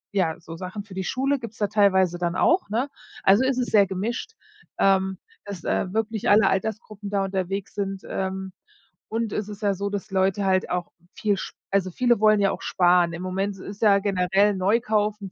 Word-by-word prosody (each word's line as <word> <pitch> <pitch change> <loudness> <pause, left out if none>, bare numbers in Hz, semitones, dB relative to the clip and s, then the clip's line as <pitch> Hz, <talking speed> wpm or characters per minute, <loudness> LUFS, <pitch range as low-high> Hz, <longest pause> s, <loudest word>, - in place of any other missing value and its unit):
ja, 170 -4 +1
so 165 0 -9
Sachen 185 +4 -6
für 205 - -13
die 190 0 -3
Schule 270 +5 0
gibt's 225 -2 -9
da 210 - +1
teilweise 190 -4 +3
dann 175 0 -1
auch, 340 - +2
ne? 240 +6 0 0.4
Also, 200 +6 +5
es 260 -1 +1
ist 250 -1 -1
sehr 200 -3 +5
gemischt, 220 - -3 0.4
ähm, 190 -1 +2 0.3
dass, 200 -4 -7
äh, 185 - -1
wirklich 220 0 -1
alle 210 +2 +6
Altersgruppen 210 0 -3
da 200 -1 0
unterwegs 195 0 -3
sind. 195 -1 -4
Ähm, 190 0 -3 0.6
und 225 0 -2
es 210 - -2
ist 205 0 -9
ja 200 -2 +1
so, 200 +2 -3
dass 205 -1 -4
Leute 195 +1 +1
halt 190 -1 +1
auch 180 -1 -2 0.2
viel 210 -1 0
sp - - -6 0.2
also, 190 -1 0
viele 240 +3 +2
wollen 215 -1 +5
ja 195 -1 +3
auch - - -6
sparen. 175 -1 +3
Im 170 - -6
Moment 195 +2 -2
ist 200 +2 -9
ja 200 -3 +5
generell 195 +1 +2
neu 195 +5 +2
kaufen 210 -3 -1
200 Hz, 200 wpm, -24 LUFS, 190-215 Hz, 0.6 s, alle